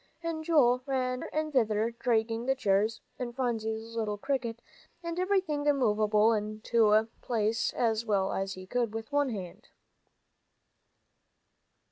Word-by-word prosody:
And 330 -1 -3
Joel 265 -7 +4
ran 255 -2 -1
hither - - -6
and 310 0 -2
thither, 220 -3 +2
dragging 230 -1 0
the 270 - +3
chairs, 215 -2 +1 0.2
and 240 -2 -4
Phronsie's 225 -3 -2
little 215 -2 -1
cricket, 240 -2 -2 0.4
and 335 +1 -3
everything 370 -6 +1
movable 220 -6 +3
into 215 +1 +2
place 225 0 0
as 225 -1 +1
well 200 -4 0
as 195 0 -2
he 185 0 -9
could 235 +1 -1
with 225 +4 -6
one 285 -1 +2
hand. 190 -7 -7
230 Hz, 130 wpm, -30 LUFS, 215-265 Hz, 0.4 s, Joel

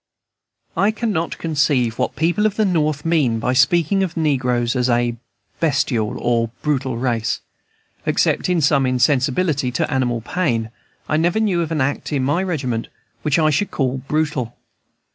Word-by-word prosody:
I 200 - +3
cannot 215 -7 -2
conceive 145 -7 0
what - - -1
people 175 +7 +2
at 210 - -4
the 215 - +2
North 155 -5 0
mean 150 -9 +2
by 125 +3 0
speaking 170 +8 +3
of 185 -3 -2
the 165 - -1
negroes 125 -5 +1
as 125 0 +1
a 120 0 +1 0.4
bestial 135 -8 0
or 115 -1 0
brutal 135 -5 -1
race. 115 -2 -1 0.7
Except - - +1
in 175 -2 +2
some 140 -2 +3
insensibility 130 +2 +1
to 125 - -1
animal 120 -3 0
pain, 115 -7 -1 0.4
I 155 - +1
never 170 +6 +2
knew 195 -6 +1
of 165 -1 -3
an 155 -3 0
act 140 +4 -2
in 140 -3 0
my 145 +7 +1
regiment 135 -11 -2 0.3
which 145 +2 +1
I 155 -1 +3
should 175 +8 0
call 130 -1 -1
brutal. 140 -3 -2
140 Hz, 160 wpm, -20 LUFS, 125-165 Hz, 0.7 s, I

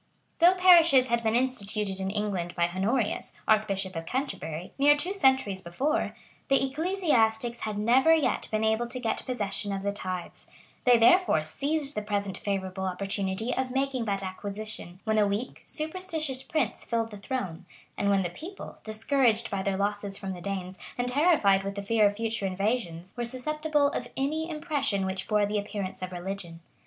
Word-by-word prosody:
[] - - -42
Though 350 +2 +7
parishes 335 -8 +6
had 235 0 +2
been 220 0 +1
instituted 210 -6 0
in 190 0 -2
England 195 -4 -2
by 170 -1 +2
Honorius, 210 +5 -1
archbishop 200 -4 +1
of 165 0 -5
Canterbury, 180 - -4
near 290 +1 +6
two 360 +6 -1
centuries 265 - +2
before,[] 270 - -1 0.3
the 275 0 +3
ecclesiastics 265 - +1
had 215 -1 -3
never 245 +9 +4
yet 320 -3 +2
been 215 0 0
able 220 +2 +1
to 255 +2 -4
get 230 -3 -2
possession 205 -4 -1
of 195 0 -3
the 200 - 0
tithes; 185 -3 -6 0.4
they 245 -1 +7
therefore 355 - +5
seized 280 - 0
the 210 - -2
present 200 -2 -2
favorable 190 -1 -3
opportunity 195 +4 -2
of 260 0 -1
making 265 -2 -1
that 200 -2 -1
acquisition; 195 -1 -5
when 220 -1 +1
a 205 - +4
weak, 205 +5 -3
superstitious 315 -4 -2
prince 270 -5 -2
filled 230 -1 -1
the 210 - -8
throne, 190 -7 -4 0.3
and 200 - 0
when 195 -1 +3
the 175 - -3
people, 350 - -9
discouraged 225 +1 +1
by 195 -1 -1
their 195 0 -1
losses 205 0 -2
from 190 -1 -5
the 180 - -9
Danes, 190 -1 -4 0.2
and 245 0 -1
terrified 255 - +4
with 200 0 -4
the 200 - -4
fear 215 0 +4
of 205 - -2
future 225 -2 -2
invasions, 190 -3 -2
were 240 - -2
susceptible 295 +4 0
of 245 - -3
any 310 +4 -1
impression 290 - 0
which 190 0 -3
bore 210 -1 +3
the 205 +1 -1
appearance 200 -2 -5
of 185 0 -4
religion. 180 -2 -6
215 Hz, 175 wpm, -28 LUFS, 195-265 Hz, 0.4 s, Though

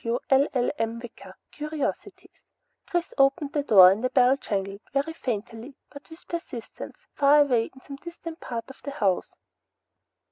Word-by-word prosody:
W 235 +1 0
LLM. 250 -4 +1
WICKER, 235 -1 -11 0.2
CURIOSITIES 310 +6 -5 0.5
Chris 350 -1 -2
opened 275 +2 +2
the 295 - +1
door 190 -9 +8
and 205 +5 -2
a 255 - +1
bell 255 0 +4
jangled, 200 -5 -4
very 280 +4 -1
faintly, 230 -1 -5 0.2
but 285 - -13
with 320 +2 -14
persistence, 300 -9 -7
far 290 +1 +5
away 245 -6 +2
in 260 - -15
some 275 +1 -9
distant 335 +1 -9
part 230 -2 -5
of - - -18
the 285 - -5
house. 200 -9 -1
270 Hz, 150 wpm, -26 LUFS, 230-295 Hz, 0.5 s, door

